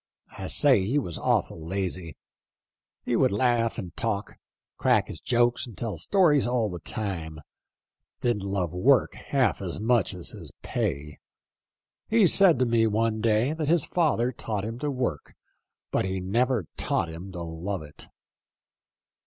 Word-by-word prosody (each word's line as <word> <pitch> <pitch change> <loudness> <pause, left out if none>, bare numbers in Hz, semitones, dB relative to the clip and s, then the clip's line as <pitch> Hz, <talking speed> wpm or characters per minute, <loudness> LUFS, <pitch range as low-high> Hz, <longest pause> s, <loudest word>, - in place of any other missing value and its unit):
I 95 - -5
say 130 -6 +4
he 120 +10 0
was 90 - -2
awful 80 - 0
lazy. 90 -2 -3 0.9
He - - 0
would - - +3
laugh 115 +1 +1
and 90 - -6
talk 105 -3 -3 0.2
— - - -67
crack - - +3
his - - -8
jokes 120 +1 +1
and 115 - -12
tell 115 -4 -3
stories 160 -10 +3
all 120 -4 0
the 90 - -6
time; 85 -5 -4 0.8
didn't 120 -4 +1
love 95 -3 -2
work 125 +9 +3
half 130 -8 0
as 90 -2 -3
much 110 -2 +1
as 90 - -4
his - - -9
pay. 75 - -3 0.9
He 225 -2 +5
said 180 -2 +6
to 125 - +2
me 115 -1 +3
one 110 0 0
day 115 +5 +2
that 155 -2 -2
his 165 -2 +3
father 150 -8 +1
taught 105 -4 -4
him 115 +2 -5
to 150 +2 -2
work; 125 - -3 0.6
but - - +1
he 95 0 -2
never 115 +3 +1
taught - - 0
him 85 +4 -8
to 85 -1 -5
love 85 +2 -4
it." 75 - -9
110 Hz, 160 wpm, -26 LUFS, 95-125 Hz, 0.9 s, said